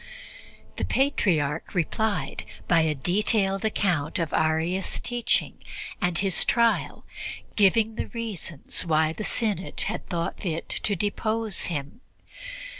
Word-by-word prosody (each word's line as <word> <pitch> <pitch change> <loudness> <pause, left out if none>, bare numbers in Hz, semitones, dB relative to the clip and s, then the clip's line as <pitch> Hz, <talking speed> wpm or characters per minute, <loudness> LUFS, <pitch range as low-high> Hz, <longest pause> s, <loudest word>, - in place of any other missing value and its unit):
The - - -1
Patriarch 170 - +1
replied 200 +4 0 0.2
by 170 -2 +5
a 155 -1 +1
detailed 195 +5 +1
account 180 -7 +1
of 165 -4 -1
Arius' 160 +4 +1
teaching 240 -1 0 0.4
and 180 -3 +1
his 195 -1 +3
trial, 235 -1 +2 0.5
giving 215 +2 +4
the - - -3
reasons 210 - -4
why 160 -2 +2
the 215 - -5
Synod 210 -5 -1
had - - -3
thought 170 -1 -2
fit 165 -3 -3
to 205 - 0
depose 215 +2 -1
him. 145 - -4
190 Hz, 115 wpm, -26 LUFS, 165-215 Hz, 0.5 s, by